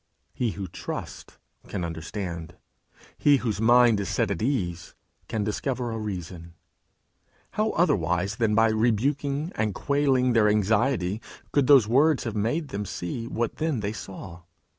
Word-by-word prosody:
He 120 -4 -1
who 100 -2 -4
trusts - - -7 0.3
can 90 -4 -3
understand; 85 0 -6 0.6
he 145 -1 +5
whose 110 -4 -2
mind 120 -1 +5
is 100 -2 -3
set 100 - 0
at 100 - -3
ease 95 -9 -2 0.3
can 110 -2 -2
discover 120 +3 -2
a 115 - -3
reason. 90 -5 -6 1.0
How 215 +1 0
otherwise 100 - +1
than 110 -2 +2
by 115 0 +5
rebuking 140 - 0
and 105 -3 -1
quelling 135 -3 +2
their 110 -2 +4
anxiety, 105 -1 +1 0.3
could 140 -3 +2
those 135 -7 +7
words 140 +5 +3
have 115 -3 -4
made 125 +9 -1
them 105 -2 -3
see 115 +7 -4
what 120 -1 -2
then 155 -7 -1
they 105 +1 -2
saw? 95 -3 -9
110 Hz, 145 wpm, -26 LUFS, 100-130 Hz, 1.0 s, those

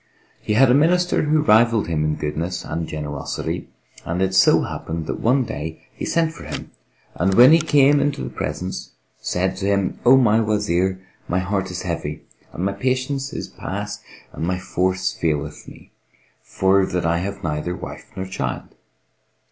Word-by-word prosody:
He 105 - -1
had 125 +3 +5
a - - +5
Minister 175 +5 +3
who 150 0 +2
rivalled 115 -3 +4
him 80 -2 0
in 75 0 0
goodness 80 +4 -3
and 80 -1 -3
generosity 75 -2 -4 0.3
and 85 +2 -3
it 95 0 +1
so - - +5
happened 80 0 -4
that - - -4
one 130 +3 +3
day, 80 -6 -6
he - - -5
sent 165 -1 +1
for - - -11
him - - -6 0.4
and 95 +3 +1
when 125 +6 +9
he 165 - +7
came 145 -2 +4
into 145 -1 0
the - - -5
presence 90 +1 -5 0.3
said 95 +1 -1
to 100 0 -2
him, 100 -2 0
"O 125 +2 +7
my 115 -4 +4
Wazir, 95 -4 0 0.3
my 90 - 0
heart 95 +1 -1
is 90 0 -5
heavy 80 -3 -4 0.3
and 90 - -3
my 100 - 0
patience 130 +5 -1
is - - -5
past - - -6 0.3
and - - -5
my 90 +2 0
force 95 +1 -1
faileth 75 -3 -2
me, - - -14 0.5
for 95 +1 +2
that 90 -1 -2
I 85 0 +2
have 100 +2 -5
neither 80 +2 -2
wife - - -9
nor 95 -1 -4
child. 65 -10 -4
95 Hz, 175 wpm, -22 LUFS, 85-125 Hz, 0.5 s, when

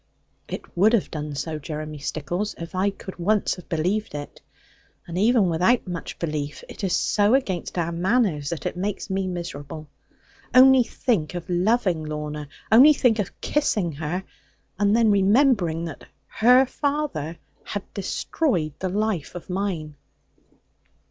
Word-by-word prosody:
'It - - -8
would 205 +6 +4
have 230 - +1
done 150 -2 -5
so, 155 +2 -3
Jeremy 150 0 -6
Stickles, 175 +8 -3
if 165 0 -8
I 185 +2 +2
could 195 -2 -9
once 205 +4 +2
have 180 - -13
believed 180 +4 -1
it. 145 0 -7 0.6
And 170 - -7
even 215 +1 +4
without 180 +8 +2
much 175 -2 -5
belief, 150 -3 -4
it - - -10
is 190 - 0
so 210 +4 +3
against 190 -10 -2
our 170 -1 0
manners, 175 - +1
that 170 - -5
it - - -2
makes 195 +2 -3
me 190 0 0
miserable. 155 -4 -6 0.7
Only 260 0 +8
think 220 -8 -1
of 175 - -5
loving 180 -2 +1
Lorna, 150 -1 -5 0.2
only 265 +7 +8
think 240 -5 +2
of 200 - -4
kissing 215 - 0
her; 160 +5 -3 0.6
and 205 +1 +3
then 225 -2 +4
remembering 200 - +3
that 165 - -8 0.2
her 250 +4 +5
father 275 - -2 0.3
had 205 -2 -4
destroyed 190 - -1
the 185 - -2
life 205 -5 -1
of 175 +1 -7
mine!' 180 -6 -2
185 Hz, 150 wpm, -24 LUFS, 160-215 Hz, 0.7 s, Only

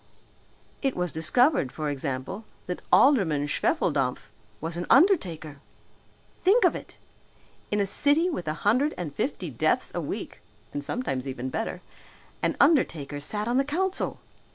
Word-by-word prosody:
It 270 -2 0
was 180 -2 -1
discovered, 160 - +2
for 155 -2 -3
example, 140 +8 -4 0.2
that 180 - -4
Alderman 190 - +4
Schwefeldampf 145 - 0 0.3
was 165 +1 -4
an 175 +1 -4
undertaker! 175 - +3 0.8
Think 410 +6 +5
of - - +3
it! - - -9 0.7
In 210 - 0
a 200 - +2
city 290 - +2
with 240 - -3
a 155 - -1
hundred 255 +9 +3
and 165 -5 -5
fifty - - -3
deaths - - 0
a - - -2
week, - - -6 0.3
and 145 - -3
sometimes 140 - -3
even 130 -1 -4
better, 225 - -3 0.6
an - - 0
undertaker 165 - +2
sat 210 +9 -3
on 240 +2 +1
the 270 - +4
council! 365 +7 -1
180 Hz, 145 wpm, -27 LUFS, -, 0.8 s, Think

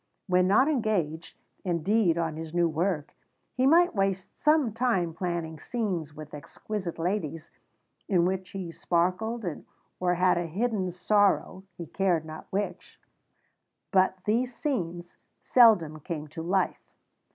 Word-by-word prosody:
When 180 -1 +3
not 210 +8 +5
engaged, 200 - -1 0.3
indeed, 175 +1 +2
on 165 -2 -1
his 160 +1 -7
new 175 -1 +3
work, 165 -1 -1 0.4
he 255 +1 +2
might 345 +4 +5
waste 195 -2 -1
some 300 -7 +2
time 210 -8 0
planning 165 -2 -3
scenes 185 - -3
with 155 -1 -10
exquisite 175 +5 -6
ladies, 165 -3 -3 0.6
in 180 -4 +3
which 185 0 -2
he 185 -4 -6
sparkled 185 +8 -1 0.5
or 180 -1 +1
had 180 0 +3
a 175 - -3
hidden 200 +1 -1
sorrow 190 +1 +1
(he 170 - -6
cared 175 -2 0
not 155 0 -9
which); 190 -2 -4 0.9
but 190 -1 +3
these 240 +3 0
scenes 175 - -3 0.3
seldom 195 -11 +5
came 155 -1 -5
to 160 - -7
life. 185 +4 -1
180 Hz, 130 wpm, -28 LUFS, 165-210 Hz, 0.9 s, not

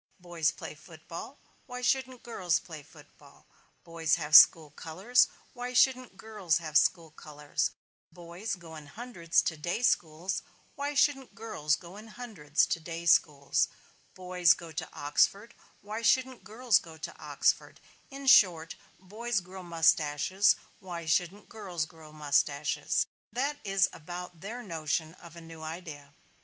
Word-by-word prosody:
Boys 170 -3 0
play - - -7
football, 165 - -10 0.3
why 250 -1 -6
shouldn't 255 0 0
girls 185 -8 0
play 155 -3 -9
football; 145 - -19 0.4
boys 165 -2 0
have 150 -2 0
school 155 -3 +8
colors, 190 - +2 0.3
why 245 0 -6
shouldn't 255 -4 +2
girls 200 -6 -1
have 155 -3 -7
school 165 +1 +3
colors; 150 -2 -3 0.4
boys 175 +5 -6
go 165 -3 -12
in 150 -2 -11
hundreds 180 -3 -1
to 160 - -2
day 175 +9 -3
schools, 175 -3 0 0.3
why 285 0 -4
shouldn't 270 -5 +1
girls 180 -9 -1
go 175 +2 -12
in 215 +2 -11
hundreds 210 -11 -1
to - - -2
day 165 +1 -7
schools; 145 -4 +3 0.5
boys 180 -2 +3
go 170 -2 -11
to 155 - -5
Oxford, 200 +10 0 0.3
why 215 +2 -6
shouldn't 255 -1 +1
girls 220 +1 +2
go 160 -1 -13
to 160 +2 -7
Oxford - - 0 0.3
in 275 0 -9
short, 175 -10 +5 0.2
boys 215 +4 -3
grow 185 +1 -10
mustaches, 165 +2 +2 0.2
why 175 -3 -7
shouldn't 175 +5 0
girls 185 -8 -4
grow 160 -1 -15
mustaches 145 0 0 0.3
that 280 +6 -2
is 195 -2 +2
about 175 +1 -8
their 230 +6 -6
notion 160 -3 -3
of 170 -2 -15
a 170 - -10
new 165 -1 -12
idea. 155 -3 -8
175 Hz, 145 wpm, -29 LUFS, 160-220 Hz, 0.5 s, school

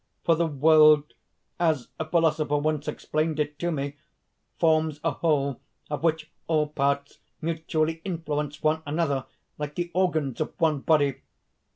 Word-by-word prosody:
For 165 - +4
the 165 +1 +1
world 150 0 +5 0.5
as 160 -7 +1
a 160 - -1
philosopher 155 -2 +2
once 150 0 -1
explained 155 0 -2
it 150 0 -2
to 175 0 -1
me, 145 -1 -3 0.6
forms 155 -2 +2
a 165 - +2
whole, 140 -3 0 0.3
of 150 - -2
which 160 -1 0 0.2
all 155 -2 +1
parts 140 -1 -1 0.2
mutually 160 0 -1
influence 150 -5 -3
one 155 +1 +2
another, 145 -3 -1 0.3
like 150 0 -4
the 175 0 -3
organs 160 -8 0
of 155 - -4
one 155 -3 +2
body. 145 -2 +2
155 Hz, 145 wpm, -26 LUFS, 145-160 Hz, 0.6 s, world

